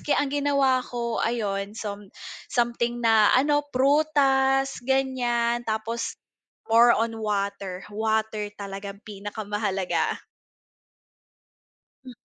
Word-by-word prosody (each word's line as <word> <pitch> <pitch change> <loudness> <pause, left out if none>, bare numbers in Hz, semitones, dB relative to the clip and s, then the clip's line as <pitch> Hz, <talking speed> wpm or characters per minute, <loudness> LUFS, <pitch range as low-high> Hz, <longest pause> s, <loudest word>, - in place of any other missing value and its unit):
kaya 295 - 0
ang 275 - -5
ginawa 280 -3 +2
ko 235 -2 -3
ayon 205 -3 -2
some 205 -2 -6 0.4
something 240 0 0
na 220 -2 +5
ano, 290 +2 +3
prutas 270 -1 +2
ganyan 240 -3 +1
tapos 220 +2 -3 0.5
more 235 +2 +6
on 225 +1 0
water, 200 -3 -3
water 220 -1 -1
talagang 200 0 -7
pinakamahalaga. 205 -2 -2 1.9
Hmm. 255 - -9
230 Hz, 95 wpm, -25 LUFS, 205-260 Hz, 1.9 s, more